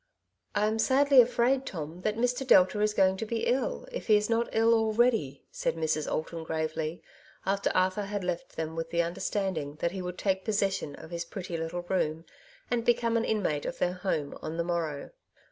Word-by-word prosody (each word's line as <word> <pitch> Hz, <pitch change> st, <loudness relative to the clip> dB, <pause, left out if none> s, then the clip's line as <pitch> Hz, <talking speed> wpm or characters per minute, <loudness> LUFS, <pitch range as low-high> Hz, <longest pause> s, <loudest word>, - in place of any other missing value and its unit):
^' -, -, +2 dB
I 210 Hz, -, +3 dB
am 220 Hz, +1 st, 0 dB
sadly 275 Hz, +2 st, +6 dB
afraid, 250 Hz, +2 st, +2 dB
Tom, 170 Hz, -, -6 dB
that 215 Hz, +2 st, -1 dB
Mr. 245 Hz, +2 st, +1 dB
Delta 200 Hz, -1 st, +5 dB
is 210 Hz, 0 st, +1 dB
going 190 Hz, 0 st, +4 dB
to 225 Hz, -, -3 dB
be 230 Hz, 0 st, -1 dB
ill, 260 Hz, -, 0 dB
if -, -, -6 dB
he 215 Hz, -2 st, +6 dB
is 210 Hz, +2 st, -1 dB
not 230 Hz, +1 st, +1 dB
ill 225 Hz, +1 st, +4 dB
already,'^ 225 Hz, -, +2 dB
said -, -, -1 dB
Mrs. 155 Hz, -1 st, -1 dB
Alton 160 Hz, +1 st, -3 dB
gravely, 160 Hz, +1 st, -3 dB, 0.4 s
after 195 Hz, +1 st, +1 dB
Arthur 185 Hz, +2 st, +2 dB
had 205 Hz, -1 st, -3 dB
left 180 Hz, -1 st, -4 dB
them 160 Hz, 0 st, -4 dB
with 165 Hz, 0 st, -3 dB
the 170 Hz, 0 st, +1 dB
under 170 Hz, +1 st, -5 dB
standing 170 Hz, -8 st, -2 dB
that 170 Hz, +2 st, -1 dB
he 190 Hz, 0 st, -5 dB
would 180 Hz, 0 st, -5 dB
take 190 Hz, -1 st, 0 dB
possession 195 Hz, -8 st, -1 dB
of 160 Hz, -, -12 dB
his 170 Hz, 0 st, -3 dB
pretty 180 Hz, -1 st, -6 dB
little 165 Hz, +2 st, -3 dB
room, 165 Hz, -3 st, -1 dB, 0.5 s
and 240 Hz, -1 st, +1 dB
become 235 Hz, -1 st, +2 dB
an 230 Hz, -, +2 dB
inmate 180 Hz, -9 st, 0 dB
of -, -, -4 dB
their 180 Hz, -, 0 dB
home, 180 Hz, -6 st, -2 dB
on 160 Hz, +1 st, -5 dB
the 170 Hz, -, +1 dB
morrow. 165 Hz, -4 st, -3 dB
190 Hz, 205 wpm, -29 LUFS, 165-225 Hz, 0.5 s, sadly